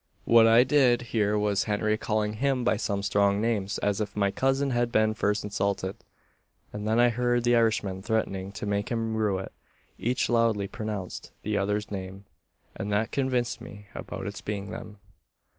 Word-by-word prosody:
What 115 -1 +6
I 115 +2 +7
did 130 -3 +3
hear 105 -2 +2
was 105 -1 +1
Henry 105 0 +1
calling 105 -1 -1
him 130 +2 0
by 120 -2 +2
some 100 -2 -2
strong 100 0 +2
names, 105 -3 -1
as 105 +1 +1
if 105 -1 -4
my 100 -1 +1
cousin 135 +4 +1
had 120 -1 0
been 110 -1 +3
first 105 -1 0
insulted; 100 -2 -2 0.8
and 105 0 -4
then 110 +2 +2
I 120 0 +6
heard 120 0 +1
the 120 0 +4
Irishman 105 -5 +1
threatening 100 -3 -2
to 105 - -5
make 100 0 -1
him 115 -2 -1
rue 105 -3 +1
it. 95 - -6 0.5
Each 125 +2 0
loudly 115 -4 +2
pronounced 105 -3 -6
the 105 0 -1
other's 105 +1 -1
name; 95 0 -6 0.5
and 100 +2 -4
that 110 +3 0
convinced 130 -3 -1
me 100 0 -11
about - - -6
its - - -6
being 100 -1 -4
them. 105 -1 -8
105 Hz, 175 wpm, -27 LUFS, 100-115 Hz, 0.8 s, I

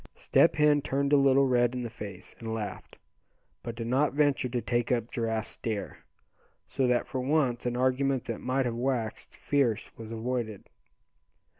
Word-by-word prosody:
Step - - +3
Hen 150 -1 +4
turned 140 +1 0
a - - +9
little 135 -1 +5
red 120 -1 +2
in 125 - -3
the 120 - -4
face, 100 -4 -9
and 115 -1 -4
laughed; 105 -2 -6 0.6
but 115 - -6
did 115 0 -4
not 130 +4 +2
venture 145 -3 +2
to 120 0 -1
take 120 0 -1
up 120 -2 0
Giraffe's 110 -1 -2
dare, 110 -3 -4 0.7
so 130 - 0
that 125 -1 +2
for 130 - -3
once 130 -3 +1
an 120 0 -1
argument 130 0 +1
that 115 - -4
might 130 +1 0
have 120 - -1
waxed 120 -2 -2
fierce 135 -7 0
was 110 -1 -8
avoided. 115 -2 -3
125 Hz, 170 wpm, -29 LUFS, 115-135 Hz, 0.7 s, a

